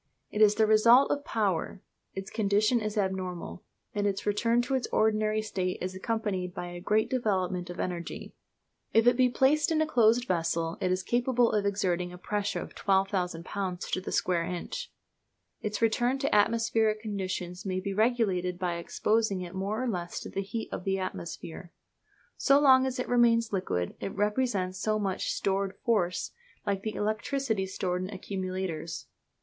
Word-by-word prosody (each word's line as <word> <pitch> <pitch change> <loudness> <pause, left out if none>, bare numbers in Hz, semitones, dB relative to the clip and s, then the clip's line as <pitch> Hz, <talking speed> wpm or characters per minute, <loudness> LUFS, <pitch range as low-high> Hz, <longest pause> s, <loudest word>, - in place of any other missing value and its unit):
It 210 - -1
is 210 -1 +6
the 220 0 +4
result 230 +5 +6
of 285 - -1
power; 195 - -1 0.3
its 190 0 -6
condition 215 +2 +2
is 215 0 -3
abnormal; 185 -3 -3 0.3
and 205 -1 0
its 195 -1 -2
return 230 +3 +2
to 270 - -3
its 260 -2 0
ordinary 215 0 +2
state 185 -4 -2
is 185 +1 -3
accompanied 190 -3 -2
by 175 - -5
a 175 - -7
great 215 +4 +2
development 185 -7 -1
of 175 - -7
energy. 175 -2 -4 0.6
If 225 0 +5
it 245 - +6
be 255 0 +4
placed 295 +6 +3
in 315 - +2
a 315 - +3
closed 245 -3 +3
vessel 165 -1 -1
it 185 - +1
is 185 +1 0
capable 240 +2 +2
of 205 -1 +1
exerting 180 -3 0
a 180 - -9
pressure 205 +2 -2
of - - -7
12,000 190 -4 0
lbs. 185 -3 -4
to 185 - 0
the - - -6
square 175 -2 +1
inch. 180 - -5 0.7
Its 210 +1 -2
return 240 +3 +2
to 275 +1 -1
atmospheric 225 0 +2
condition 190 -4 -3
may 185 -1 -2
be 195 +1 -3
regulated 200 -5 +1
by 175 -2 -1
exposing 210 +3 0
it 175 0 -7
more 200 +5 -2
or - - -1
less 175 -6 -3
to - - -8
the 195 - -2
heat 220 +3 -5
of - - -4
the 195 0 0
atmosphere. 170 -2 -6 0.6
So 280 0 +5
long 265 -2 +6
as 255 - -3
it 250 - -2
remains 230 -2 +3
liquid 135 - -1
it - - -5
represents 205 -3 0
so 215 0 +1
much 195 -3 -2
stored 195 0 -1
force, 185 -6 +1 0.3
like 200 -1 0
the 215 +1 -4
electricity 220 0 -1
stored 180 -1 -2
in 185 - -4
accumulators. 185 -5 -4
205 Hz, 175 wpm, -29 LUFS, 185-230 Hz, 0.7 s, is